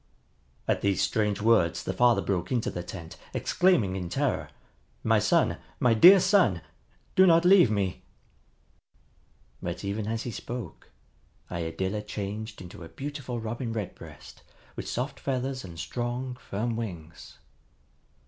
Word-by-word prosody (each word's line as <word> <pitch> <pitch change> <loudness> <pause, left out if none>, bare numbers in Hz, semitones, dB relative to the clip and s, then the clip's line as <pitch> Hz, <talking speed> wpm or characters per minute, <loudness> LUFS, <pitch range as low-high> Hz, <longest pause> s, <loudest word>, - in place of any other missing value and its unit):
At - - +1
these 100 -1 +1
strange 105 -2 0
words 110 -8 +3
the - - -2
father 120 -5 +4
broke 90 -2 -2
into 120 -3 0
the 90 - -4
tent, 85 -2 -9 0.2
exclaiming 130 - +2
in 90 -2 -4
terror, 135 +6 -1 0.5
"My - - +4
son, - - +2 0.2
my 120 -2 +4
dear 180 - +9
son! 180 - +3 0.5
Do 190 0 +7
not 170 0 +5
leave 180 - +7
me!" 100 -3 -1 1.6
But, - - -4
even 100 +1 -2
as 115 0 -2
he 120 - -4
spoke, 120 -4 -7 0.6
Iadilla 95 +4 -2
changed 105 0 -6
into 90 -1 -10
a 80 - -10
beautiful 135 -4 -5
Robin 115 +1 -4
Redbreast 105 -4 -8 0.3
with - - -6
soft 130 +4 -3
feathers 130 0 -2
and 85 -3 -10
strong, 120 +5 -3
firm 115 0 -3
wings. 85 -8 -7
110 Hz, 135 wpm, -28 LUFS, 95-125 Hz, 1.6 s, dear